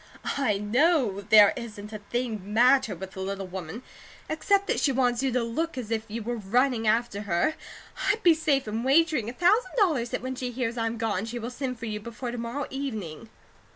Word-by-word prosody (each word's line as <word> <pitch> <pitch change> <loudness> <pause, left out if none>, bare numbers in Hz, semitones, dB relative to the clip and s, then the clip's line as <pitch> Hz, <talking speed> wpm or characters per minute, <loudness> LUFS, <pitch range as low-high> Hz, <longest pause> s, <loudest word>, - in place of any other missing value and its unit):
"I 240 -8 +1
KNOW 220 - +1
'there 210 -2 +8
isn't 215 -3 -8
a 215 - -5
thing 235 +1 -3
the 185 - -14
matter 250 +6 +3
with 190 0 -8
the 190 - -10
little 195 0 -3
woman,' 185 +4 -7 0.5
except 395 +5 +2
that - - 0
she 280 - +2
wants 245 -2 +1
you 270 -1 0
to 245 0 +1
look 305 +7 -3
as 230 -3 -5
if 220 -1 -1
you 225 +1 -5
were 240 +2 -3
running 230 +3 +1
after 225 -2 +1
her. 175 - +2 0.6
I'd 445 +2 +1
be 345 -2 +7
safe 295 -5 0
in 220 +2 -2
wagering 285 -3 +3
a - - -6
thousand 365 - +2
dollars 310 - +2
that - - -3
when 260 0 -3
she 255 -1 -4
hears 245 -1 -2
I'm 230 -1 -2
gone, 220 -3 -1
she 235 +2 -5
will 235 +1 -5
send 255 -1 -4
for 230 - -7
you 210 -1 -3
before 235 +3 -6
to 240 - -5
morrow 240 +5 -3
evening." 220 - -5
235 Hz, 215 wpm, -27 LUFS, 215-265 Hz, 0.6 s, there